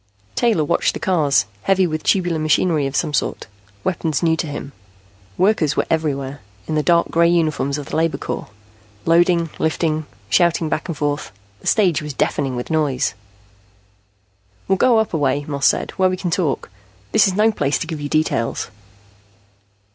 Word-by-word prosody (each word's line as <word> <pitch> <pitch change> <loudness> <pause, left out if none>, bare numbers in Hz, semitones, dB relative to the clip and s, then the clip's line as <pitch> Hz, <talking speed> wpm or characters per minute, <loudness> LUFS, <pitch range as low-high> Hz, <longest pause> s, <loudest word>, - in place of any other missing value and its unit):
Taylor 225 -10 +2
watched 145 - +1
the - - -4
cars, 150 - +2 0.2
heavy 190 -1 +3
with 155 -2 -2
tubular 175 -4 +1
machinery 155 -1 +2
of 135 - -6
some 155 -3 0
sort, - - -1 0.4
weapons 160 -5 -1
new 165 -1 +3
to 160 - -3
him. 145 -1 -6 0.7
Workers 180 -7 +2
were - - +2
everywhere, 145 -4 -1 0.3
in - - -3
the 155 - +2
dark 170 +2 +3
gray 170 0 +4
uniforms 155 -4 +1
of 145 - -6
the - - -6
labor 165 0 +1
corps, - - -5 0.6
loading, 170 -1 +3
lifting, 155 -1 0 0.2
shouting 165 - +2
back - - -2
and 165 -4 -4
forth. 145 0 -2 0.3
The - - -10
stage 185 -8 +3
was 150 -2 -6
deafening 135 -2 0
with 125 +5 -5
noise. 145 -10 +1 1.5
"We'll 190 - +2
go 245 -3 +5
up 220 -3 0
a - - +1
way," 140 0 0
Moss 140 -2 +1
said, - - +1
"where 185 -1 +4
we 185 - -2
can 180 -2 -3
talk. 165 - -1 0.4
This - - +5
is 190 - 0
no 215 +2 +4
place 145 -8 0
to - - -4
give 160 -3 -5
you 145 - -4
details." 155 -7 -1
160 Hz, 175 wpm, -20 LUFS, 145-175 Hz, 1.5 s, go